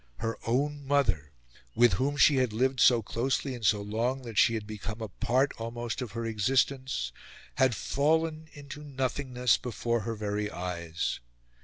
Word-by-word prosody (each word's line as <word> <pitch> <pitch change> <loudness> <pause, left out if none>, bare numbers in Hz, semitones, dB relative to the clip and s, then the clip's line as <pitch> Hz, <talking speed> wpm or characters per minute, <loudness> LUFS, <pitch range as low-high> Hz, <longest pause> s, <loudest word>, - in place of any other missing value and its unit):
Her 115 0 -2
own 140 +4 0
mother, 105 - +1 0.4
with 120 -3 +5
whom 140 +9 0
she 140 0 +6
had 125 -4 +1
lived 130 +3 +1
so 120 -2 +6
closely 130 +5 -1
and 120 -2 -8
so 100 +1 +3
long 120 +6 -1
that 115 -4 -1
she 115 -4 +5
had 110 -2 -4
become 110 +1 -6
a 110 -2 -5
part 125 +8 +1
almost 115 +2 -4
of 120 -6 -5
her 115 0 -3
existence, 125 - 0 0.5
had 130 -3 +3
fallen 160 +2 0
into 145 +1 -9
nothingness 130 -3 0
before 120 -1 -2
her 115 +2 -4
very 105 0 -2
eyes! 85 -3 -3
120 Hz, 160 wpm, -29 LUFS, 110-135 Hz, 0.5 s, she